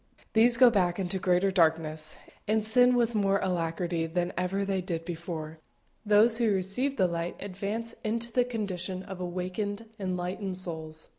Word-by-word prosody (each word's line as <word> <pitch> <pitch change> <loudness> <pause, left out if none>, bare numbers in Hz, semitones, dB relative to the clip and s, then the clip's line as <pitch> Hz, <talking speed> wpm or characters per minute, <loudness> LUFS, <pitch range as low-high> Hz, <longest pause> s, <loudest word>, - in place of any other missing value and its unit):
These 235 +2 +5
go 250 -1 +8
back 180 -5 +2
into 190 -1 -1
greater 185 +1 +2
darkness, 160 -3 +1 0.3
and 215 0 +1
sin 245 +3 +5
with 235 -1 +2
more 200 -2 +2
alacrity 170 -2 -1
than 175 +2 -1
ever 190 +2 -1
they 195 -1 0
did 170 -3 -4
before; 160 -2 -6 0.4
those 220 +2 +4
who 230 -3 +3
receive 200 +9 -1
the 190 - +4
light 170 0 -3
advance 205 +4 -4
into 230 +2 -2
the 250 +1 +3
condition 190 -6 -4
of 190 -1 -8
awakened, 185 +4 -3
enlightened 185 0 -3
souls. 160 -3 -6
190 Hz, 155 wpm, -29 LUFS, 175-215 Hz, 0.4 s, go